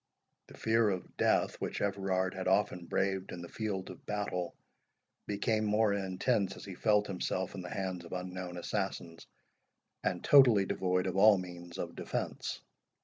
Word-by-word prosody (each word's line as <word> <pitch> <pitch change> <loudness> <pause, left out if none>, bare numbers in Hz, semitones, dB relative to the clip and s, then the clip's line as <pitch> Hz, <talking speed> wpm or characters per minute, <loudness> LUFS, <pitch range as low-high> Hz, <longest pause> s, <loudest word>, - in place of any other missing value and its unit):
The - - -14
fear 110 -1 +3
of 95 -2 -4
death, - - +2
which - - -2
Everard 95 -2 0
had 95 0 -4
often 95 -2 +1
braved 95 +1 0
in 85 - -6
the - - -7
field 95 -2 -3
of 90 - -13
battle, 100 -4 -2 0.7
became 110 +2 0
more 105 0 +3
intense 100 +1 0
as - - -10
he 100 - -7
felt 105 +2 +3
himself 95 -1 -2
in 95 - -5
the 90 - -7
hands 95 -3 -3
of 85 - -12
unknown 90 -1 -5
assassins, 85 -1 -3 0.8
and 90 - -1
totally 120 -8 +7
devoid 90 -1 0
of 95 0 -2
all 105 +1 +7
means 85 -1 -8
of - - -4
defence. - - -3
95 Hz, 160 wpm, -32 LUFS, 90-105 Hz, 0.8 s, totally